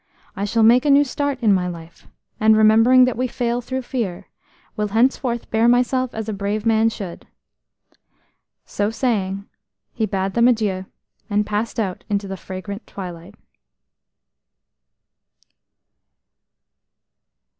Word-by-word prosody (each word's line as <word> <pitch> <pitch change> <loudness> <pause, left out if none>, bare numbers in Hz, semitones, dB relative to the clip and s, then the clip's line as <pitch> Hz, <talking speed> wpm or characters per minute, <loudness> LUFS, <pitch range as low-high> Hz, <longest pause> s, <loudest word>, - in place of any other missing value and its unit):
I 200 - -2
shall 225 +2 +1
make 240 +3 +6
a 295 - +1
new 280 +1 +6
start 285 0 -2
in 210 -3 +5
life, 170 -2 -6 0.3
and, 220 0 +5
remembering 225 +4 +6
that 255 - -1
we 255 +2 -1
fail 240 0 -2
through 260 +2 -4
fear, 205 -8 -4 0.5
will 210 0 -1
henceforth 235 +2 0
bear 225 +1 +3
myself 250 +1 +1
as 220 -1 -4
a 220 - -2
brave 205 +2 -3
man 225 0 +3
should." 195 -6 -8 1.4
So 205 0 -1
saying, 200 -5 -2 0.5
he 220 - -1
bade 190 0 -2
them 235 +1 +4
adieu, 205 -6 0 0.4
and 210 0 +1
passed 210 +3 -3
out 190 -5 -3
into 200 -1 -1
the 195 - -5
fragrant 195 +3 -8
twilight. 175 -3 -9
220 Hz, 125 wpm, -21 LUFS, 200-240 Hz, 1.4 s, make